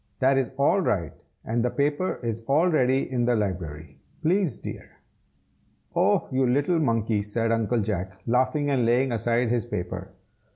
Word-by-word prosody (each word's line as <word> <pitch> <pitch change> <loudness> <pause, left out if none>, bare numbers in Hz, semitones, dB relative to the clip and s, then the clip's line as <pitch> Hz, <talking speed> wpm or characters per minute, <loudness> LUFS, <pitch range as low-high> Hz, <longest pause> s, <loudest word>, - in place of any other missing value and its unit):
"That 135 +1 +3
is 130 -4 -1
all 145 +8 +3
right, 85 - -1 0.3
and 115 +1 0
the 125 - +1
paper 145 +7 -1
is 115 -1 -3
all 155 +6 +3
ready 130 -3 +2
in 120 -2 +1
the 120 0 +2
library, 80 -8 -4 0.2
please, 175 - +1
dear." - - -9 1.0
"Oh! - - +2
you 130 0 +2
little 145 +7 +2
monkey!" 115 -6 +1
said 115 +2 -1
Uncle 115 +1 +1
Jack, 95 -2 -3
laughing 130 +4 +1
and 130 -3 +2
laying 125 +3 +2
aside 115 +1 +1
his 120 0 0
paper. 95 -2 -4
120 Hz, 160 wpm, -25 LUFS, 105-135 Hz, 1.0 s, That